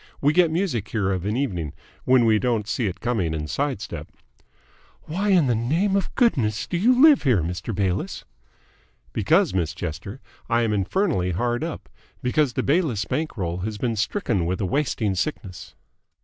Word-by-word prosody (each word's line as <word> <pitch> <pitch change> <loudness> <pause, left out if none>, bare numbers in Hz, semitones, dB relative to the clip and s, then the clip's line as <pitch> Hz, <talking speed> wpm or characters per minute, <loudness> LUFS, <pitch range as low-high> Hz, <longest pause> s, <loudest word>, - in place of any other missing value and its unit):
We 145 +2 +3
get 175 0 +4
music 160 - -1
here 105 -3 -1
of 95 -1 -2
an 105 +3 -1
evening 90 - -2 0.3
when 125 -2 +5
we 110 -1 +4
don't 115 -4 0
see 115 -1 -1
it 95 - -5
coming 100 -10 0
and 75 -1 -4
sidestep." 100 - -3 0.9
"Why 190 +6 -2
in 180 -6 +5
the 125 - +2
name 160 - +1
of 195 - -1
goodness 120 - +2
do - - -4
you 245 +8 +3
live 300 0 +7
here, 120 - +2
Mr. 90 +5 -4
Bayliss?" 95 -2 -2 0.9
"Because, - - +2
Miss 85 -4 -1
Chester, 90 - -6 0.3
I 115 0 +2
am 110 -2 0
infernally 100 - 0
hard 120 - -1
up! 165 -1 -5 0.4
Because 130 +1 +1
the - - -1
Bayliss 140 - +1
bank 155 -4 -3
roll 85 -3 -2
has 105 +3 -4
been 115 +1 -1
stricken 110 - -1
with 90 +3 -1
a 100 - -1
wasting 110 -3 0
sickness." 95 -2 -4
115 Hz, 175 wpm, -24 LUFS, 95-150 Hz, 0.9 s, live